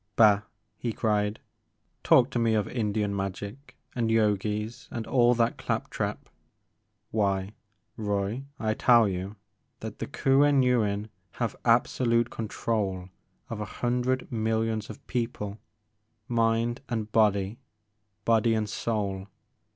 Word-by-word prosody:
Bah! 105 Hz, -3 st, +6 dB, 0.2 s
" -, -, -48 dB
he 120 Hz, -, -1 dB
cried, 105 Hz, -1 st, 0 dB, 0.3 s
'* -, -, -47 dB
talk 125 Hz, 0 st, +5 dB
to 120 Hz, -, 0 dB
me 115 Hz, -1 st, +2 dB
of 105 Hz, -2 st, +1 dB
Indian 105 Hz, -3 st, -1 dB
magic 100 Hz, +7 st, -5 dB, 0.2 s
and 115 Hz, -2 st, 0 dB
Yogis 105 Hz, +1 st, 0 dB
and 115 Hz, -1 st, -4 dB
all 120 Hz, -1 st, +4 dB
that 115 Hz, 0 st, +1 dB
clap -, -, -2 dB
trap! -, -, -3 dB, 0.8 s
Why, 100 Hz, -2 st, 0 dB, 0.4 s
Roy, 105 Hz, +4 st, -2 dB
I 110 Hz, -2 st, +1 dB
tell 120 Hz, -1 st, +5 dB
you 95 Hz, +2 st, -4 dB, 0.5 s
that -, -, -7 dB
the -, -, -3 dB
Kuen 140 Hz, 0 st, +4 dB
Yuin 110 Hz, -4 st, +1 dB, 0.2 s
have -, -, -2 dB
absolute 115 Hz, -2 st, +3 dB
control 100 Hz, -4 st, -2 dB, 0.4 s
of 110 Hz, -2 st, -5 dB
a -, -, -2 dB, 0.2 s
hundred 125 Hz, +1 st, 0 dB
millions 110 Hz, -1 st, 0 dB
of 110 Hz, -, -10 dB
people, 115 Hz, -4 st, -3 dB, 0.7 s
mind 115 Hz, +1 st, +1 dB
and 110 Hz, -3 st, -2 dB
body, 105 Hz, 0 st, +2 dB, 0.7 s
body 115 Hz, 0 st, +3 dB
and 110 Hz, -1 st, 0 dB
soul. 100 Hz, -3 st, -2 dB
110 Hz, 130 wpm, -28 LUFS, 105-120 Hz, 0.8 s, Bah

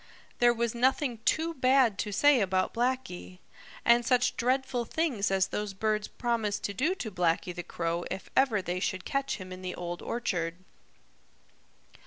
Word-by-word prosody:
There 240 Hz, 0 st, +6 dB
was 235 Hz, -1 st, -1 dB
nothing 250 Hz, 0 st, +1 dB
too 330 Hz, +1 st, +1 dB
bad 255 Hz, -6 st, +3 dB
to 210 Hz, -, -2 dB
say 270 Hz, +4 st, +5 dB
about 185 Hz, -1 st, 0 dB
Blacky. 245 Hz, -7 st, -2 dB, 0.5 s
And 240 Hz, 0 st, +5 dB
such 250 Hz, +1 st, +2 dB
dreadful 255 Hz, 0 st, 0 dB
things 265 Hz, -9 st, 0 dB
as 190 Hz, -1 st, +2 dB
those 210 Hz, -2 st, -3 dB
birds 215 Hz, +1 st, 0 dB
promised 225 Hz, -4 st, -2 dB
to 200 Hz, -, -2 dB
do 305 Hz, -, +1 dB
to 225 Hz, -, -5 dB
Blacky 175 Hz, -1 st, 0 dB
the 175 Hz, -, -5 dB
Crow 170 Hz, 0 st, -3 dB
if 190 Hz, -, -5 dB
ever 230 Hz, -7 st, +3 dB
they 180 Hz, 0 st, -2 dB
should 185 Hz, 0 st, -2 dB
catch 275 Hz, 0 st, -1 dB
him 185 Hz, -1 st, -9 dB
in 185 Hz, -, -9 dB
the 185 Hz, -1 st, -4 dB
Old 175 Hz, 0 st, -5 dB
Orchard. 170 Hz, -8 st, -2 dB
220 Hz, 165 wpm, -29 LUFS, 185-255 Hz, 0.5 s, There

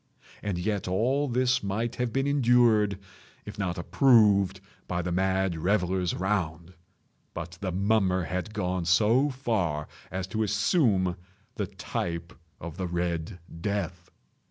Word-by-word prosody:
And 100 Hz, -4 st, -2 dB
yet 100 Hz, +2 st, -2 dB
all 125 Hz, +10 st, +1 dB
this 125 Hz, 0 st, +2 dB
might 115 Hz, +5 st, -2 dB
have 125 Hz, -1 st, -1 dB
been 135 Hz, +3 st, 0 dB
endured, 120 Hz, -7 st, +3 dB, 0.5 s
if -, -, -9 dB
not 90 Hz, -2 st, -1 dB
approved, 100 Hz, 0 st, +4 dB, 0.3 s
by 90 Hz, -1 st, -2 dB
the 90 Hz, -, -2 dB
mad 95 Hz, 0 st, +1 dB
revellers 90 Hz, 0 st, +1 dB
around. 90 Hz, -3 st, -2 dB, 0.6 s
But 85 Hz, 0 st, -7 dB
the 95 Hz, -2 st, -2 dB
mummer 95 Hz, -1 st, +2 dB
had 90 Hz, +5 st, -3 dB
gone 90 Hz, -4 st, -2 dB
so 110 Hz, -, +4 dB
far 105 Hz, -, -1 dB, 0.2 s
as 95 Hz, 0 st, -3 dB
to 110 Hz, +3 st, -2 dB
assume 105 Hz, -, +2 dB, 0.4 s
the -, -, -3 dB
type 85 Hz, 0 st, -4 dB, 0.3 s
of 85 Hz, 0 st, -8 dB
the 95 Hz, -1 st, -2 dB
Red 85 Hz, +1 st, -2 dB, 0.2 s
Death. 95 Hz, -3 st, -3 dB
95 Hz, 130 wpm, -27 LUFS, 90-110 Hz, 0.6 s, approved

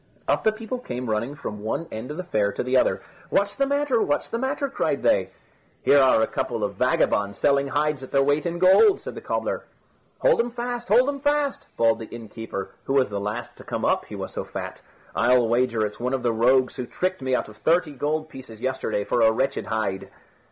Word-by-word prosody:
Up -, -, +1 dB
the 220 Hz, -, +4 dB
people 225 Hz, +3 st, -5 dB
came 125 Hz, -, -4 dB
running 115 Hz, +6 st, -1 dB
from 105 Hz, -7 st, -6 dB
one 110 Hz, +10 st, -3 dB
end 110 Hz, +4 st, -6 dB
of 150 Hz, -, -6 dB
the 185 Hz, -, -3 dB
fair 105 Hz, -, 0 dB
to -, -, -2 dB
the 125 Hz, +1 st, 0 dB
other. 130 Hz, -, +2 dB, 0.3 s
"What's 200 Hz, 0 st, +1 dB
the 275 Hz, -, +1 dB
matter? 285 Hz, -4 st, +1 dB
What's 145 Hz, -, 0 dB
the 230 Hz, -, -2 dB
matter?" 275 Hz, +2 st, -1 dB
cried 275 Hz, -, -1 dB
they. -, -, +3 dB, 0.5 s
"Here 145 Hz, -, +6 dB
are 130 Hz, -4 st, +5 dB
a -, -, +4 dB
couple -, -, -3 dB
of -, -, -1 dB
vagabonds 100 Hz, 0 st, +1 dB
selling 140 Hz, -1 st, +2 dB
hides 150 Hz, 0 st, 0 dB
at 130 Hz, -, -8 dB
their 135 Hz, 0 st, +3 dB
weight 145 Hz, +4 st, +1 dB
in 170 Hz, 0 st, -3 dB
gold," 190 Hz, -, +6 dB
said -, -, -7 dB
the -, -, -8 dB
cobbler. -, -, -2 dB, 0.6 s
"Hold -, -, +4 dB
'em 235 Hz, +1 st, +1 dB
fast; 240 Hz, 0 st, -4 dB
hold 245 Hz, +5 st, +5 dB
'em 285 Hz, -1 st, -2 dB
fast!" 290 Hz, 0 st, 0 dB
bawled 115 Hz, -1 st, +3 dB
the 110 Hz, -, -7 dB
innkeeper, 115 Hz, -3 st, -7 dB
who 135 Hz, -, -1 dB
was 130 Hz, -5 st, +3 dB
the 100 Hz, -, -2 dB
last 105 Hz, +4 st, -4 dB
to -, -, -12 dB
come -, -, -3 dB
up, -, -, +1 dB
he -, -, -9 dB
was -, -, -5 dB
so -, -, -4 dB
fat. -, -, -7 dB, 0.3 s
"I'll 125 Hz, -1 st, +4 dB
wager 120 Hz, -1 st, +1 dB
it's 105 Hz, -, -6 dB
one 125 Hz, +2 st, 0 dB
of 130 Hz, -, -4 dB
the 120 Hz, -2 st, +2 dB
rogues 125 Hz, +3 st, +3 dB
who 125 Hz, -2 st, -4 dB
tricked 185 Hz, +2 st, -2 dB
me 130 Hz, -1 st, +1 dB
out -, -, -1 dB
of 105 Hz, -1 st, -14 dB
thirty 165 Hz, -1 st, +2 dB
gold 150 Hz, +3 st, -2 dB
pieces 130 Hz, -7 st, -11 dB
yesterday 130 Hz, -4 st, -1 dB
for 120 Hz, -, 0 dB
a 110 Hz, -1 st, +6 dB
wretched 130 Hz, +4 st, -1 dB
hide." 100 Hz, -3 st, -2 dB
135 Hz, 230 wpm, -24 LUFS, -, 0.6 s, Here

